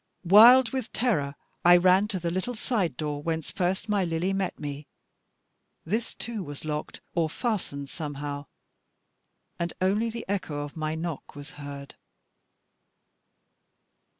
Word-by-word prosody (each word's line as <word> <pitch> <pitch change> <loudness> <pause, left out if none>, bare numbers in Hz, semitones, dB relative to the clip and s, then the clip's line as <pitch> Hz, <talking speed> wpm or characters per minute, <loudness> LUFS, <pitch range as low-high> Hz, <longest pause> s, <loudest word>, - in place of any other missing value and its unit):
Wild 230 +6 +8
with 260 -4 -3
terror 145 - 0 0.3
I 175 0 +8
ran 185 +3 +5
to 200 -3 -3
the 170 0 -2
little 185 +8 -2
side 200 - -1
door, 150 -2 -3
whence 160 0 -2
first 185 +4 -1
my 205 -2 +2
Lily 170 +2 0
met 195 -1 -2
me. 145 0 -6 1.0
This 220 +8 -2
too 230 -3 -4
was 145 -3 -7
locked, 150 0 -4
or 165 -2 +1
fastened 175 - -3
somehow; 145 -2 -5 1.1
and 170 0 -2
only 205 +5 +2
the 230 +1 -6
echo 185 -7 -2
of 145 - -8
my 155 0 -2
knock 160 -3 -5
was 145 0 -9
heard. 140 -1 -8
170 Hz, 135 wpm, -27 LUFS, 145-205 Hz, 1.1 s, Wild